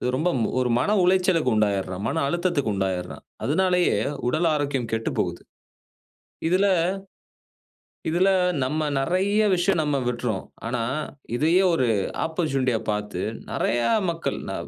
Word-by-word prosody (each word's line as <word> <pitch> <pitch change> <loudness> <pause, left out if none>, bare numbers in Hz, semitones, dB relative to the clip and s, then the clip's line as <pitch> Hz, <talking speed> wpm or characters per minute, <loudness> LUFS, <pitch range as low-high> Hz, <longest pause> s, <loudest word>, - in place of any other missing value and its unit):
ரொம்ப 160 +7 +1
ம் 115 - +1
ஒரு 125 -1 +1
மன 130 - 0
உளைச்சலுக்கு 180 -6 +3
உண்டாயிடுறான், 100 -3 0
மன 160 - -1
அழுத்தத்துக்கு 170 - 0
உண்டாயிடுறான். 95 -2 -3 0.2
அதனாலேயே 180 - +2 0.3
உடல் 155 +7 +1
ஆரோக்கியம் 140 -5 -1
கெட்டுப்போகுது. 115 0 -2 1.1
இதில 185 +3 +3 1.4
இதில 180 +4 +3 0.3
நம்ம 150 +5 -1 0.2
நெறைய 190 +8 +1
விஷயம் 180 0 +2
நம்ம 150 -1 0
விட்றோம். 120 -5 -2 0.2
ஆனா 120 0 -1 0.5
இதையே 165 +8 +3
ஒரு 130 -6 +2 0.4
ஆப்போர்ட்யூனிட்டியா 135 -8 0
பார்த்து 105 -3 -3 0.3
நெறைய 120 - 0 0.3
மக்கள் 165 -1 -2
ந - - -3
145 Hz, 115 wpm, -24 LUFS, 120-175 Hz, 1.4 s, உளைச்சலுக்கு